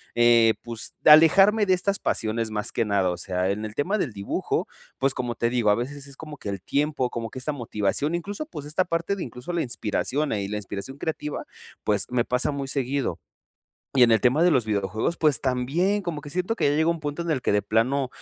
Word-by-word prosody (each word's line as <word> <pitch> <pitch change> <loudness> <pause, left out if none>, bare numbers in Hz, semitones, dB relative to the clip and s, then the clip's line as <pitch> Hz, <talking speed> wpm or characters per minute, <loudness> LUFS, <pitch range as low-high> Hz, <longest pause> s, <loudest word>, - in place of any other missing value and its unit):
eh, 120 -1 +5
pues 115 -2 -6
alejarme 195 +8 +7
de 185 - +5
estas 200 +2 -1
pasiones 110 0 -1
más 105 -1 -2
que 115 - 0
nada. 100 -3 +1
O 90 - -4
sea, 90 0 -1
en 105 +2 -3
el 110 0 -8
tema 195 +9 0
del 125 - -2
dibujo, 100 0 -2 0.3
pues 135 0 +1
como 120 -2 -3
te 115 - 0
digo, 120 -4 +1
a 105 - +5
veces 140 +4 -5
es 140 - -12
como 150 -1 -9
que - - -9
el 100 -2 -4
tiempo, 145 -3 0
como 115 -1 -4
que 130 - -8
esa 150 +4 -2
motivación, 120 +4 -1
incluso 200 - -4
pues 150 - -8
esta 155 +5 0
parte 170 +4 -1
de - - -3
incluso 125 +7 -7
la 170 -1 0
inspiración, 130 +5 -2
eh, 100 -2 -1
y - - -3
la 105 +1 -3
inspiración 100 +6 -6
creativa, 150 -1 -4 0.4
pues, 105 -2 0
me 125 -1 +1
pasa 125 +4 0
muy 140 -1 -4
seguido. 135 -1 -1 0.8
Y 125 -2 +7
en 115 - +3
el 110 - +4
tema 130 +6 +3
de 175 - +5
los 130 -6 +3
videojuegos, 110 - -1
pues 150 -5 +3
también, 140 +11 +1
como 170 -5 -4
que 145 - -9
siento 185 +7 -1
que - - 0
ya - - +1
llega 160 +2 +2
un 170 -2 -2
punto 145 +2 -4
en 170 -1 -2
el 130 -5 0
que - - +1
de 105 - +3
plano 125 +6 +1
135 Hz, 235 wpm, -25 LUFS, 115-155 Hz, 0.8 s, alejarme